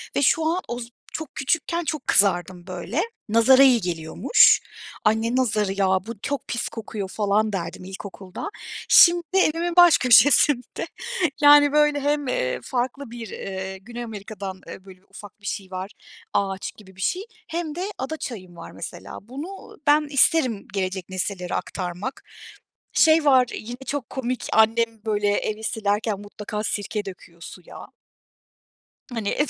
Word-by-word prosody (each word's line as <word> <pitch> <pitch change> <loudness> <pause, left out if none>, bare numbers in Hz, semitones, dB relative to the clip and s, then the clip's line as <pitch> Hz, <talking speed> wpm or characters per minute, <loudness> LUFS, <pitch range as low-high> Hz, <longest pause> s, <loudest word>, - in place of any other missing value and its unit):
ve - - +2
şu 315 +4 +3
an 340 +4 +1
oz 240 0 -5 0.2
çok 315 -2 -6
küçükken 335 +5 -1
çok 310 -1 -4
kızardım 180 -2 +2
böyle, 185 - -3 0.3
nazara 250 +5 +6
iyi 250 -5 +5
geliyormuş. 170 - +4 0.4
"Ay, 220 +1 +3
ne 230 +2 -1
nazarı 210 -6 +1
ya, 195 - +2 0.2
bu 230 -3 -7
çok 285 -3 -3
pis 235 - -2
kokuyor!" 215 -3 -6
falan 210 +1 0
derdim 175 -1 -4
ilkokulda. 190 - -8 0.4
Şimdi 345 0 +7
evimin 340 -1 +1
baş 350 -3 +8
köşesinde, 255 +1 +4 0.5
yani 290 0 +7
böyle 295 0 +3
hem, 290 0 0
eee, 125 - -1
farklı 255 +1 -3
bir, 235 -2 -7
eee, 190 0 -6
Güney 240 +3 -7
Amerika'dan, 200 -3 -7
eee, 190 - -10
böyle 185 -1 -14
ufak 205 +1 -13
bir 205 - -15
şey 195 -2 -5
var, 185 +2 -5 0.4
ağaç 195 -1 -1
gibi 190 -3 -16
bir 190 - -10
şey, 365 - -1 0.2
hem 325 -2 -4
de 355 - -4 0.2
ada 290 +5 -4
çayım 185 - -7
var 165 - -9
mesela. - - -8
Bunu 320 +10 -9
ben 300 +1 +4
isterim 275 - +2
gelecek 190 -2 -3
nesillere 185 -1 -3
aktarmak. 185 +7 -5 0.7
Şey 315 -1 +5
var 260 -3 +6
yine 240 +3 -7
çok 285 -4 -3
komik, 255 -1 -3
annem 225 0 +2
böyle 210 -1 0
evi 215 +1 -3
silerken 210 -1 -1
mutlaka 210 +1 -6
sirke 205 0 -3
döküyor 170 -3 -11
suya. 175 0 -11 1.2
Hani 220 -3 -2
220 Hz, 145 wpm, -23 LUFS, 195-280 Hz, 1.2 s, baş